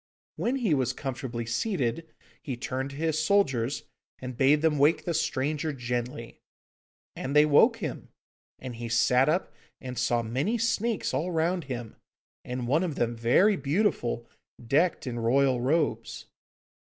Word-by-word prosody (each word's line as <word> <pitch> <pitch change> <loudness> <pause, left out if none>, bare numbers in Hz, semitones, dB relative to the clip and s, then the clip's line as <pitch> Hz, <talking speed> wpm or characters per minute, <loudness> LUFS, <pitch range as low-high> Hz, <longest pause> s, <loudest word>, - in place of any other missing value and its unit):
When 250 - -1
he 230 - +1
was 130 -4 +1
comfortably 125 -3 -5
seated, 135 - -1 0.3
he 130 -4 -5
turned 130 +2 -3
to 140 - -10
his 160 +1 0
soldiers, 140 -10 +1 0.3
and 125 -1 -7
bade 145 +5 +3
them 155 -3 +2
wake 150 +4 +3
the 170 - -1
stranger 155 0 -1
gently. 120 -2 -4 0.8
And 135 +2 -4
they 150 0 +7
woke 220 - +5
him, 160 - -6 0.5
and 125 -3 -8
he 120 0 -5
sat 125 +4 +3
up 175 +5 0 0.3
and 125 -3 -6
saw 120 -1 +1
many 135 - -1
snakes 230 0 0
all 170 +4 -1
round 170 +1 0
him, 120 -4 -6 0.5
and 125 -1 -4
one 155 +8 +2
of 165 -6 -2
them 120 -2 -1
very 125 - +4
beautiful, 140 - 0 0.4
decked 155 +7 +2
in 120 -2 -4
royal 130 +2 +2
robes. 135 -4 -1
135 Hz, 150 wpm, -27 LUFS, 120-165 Hz, 0.8 s, they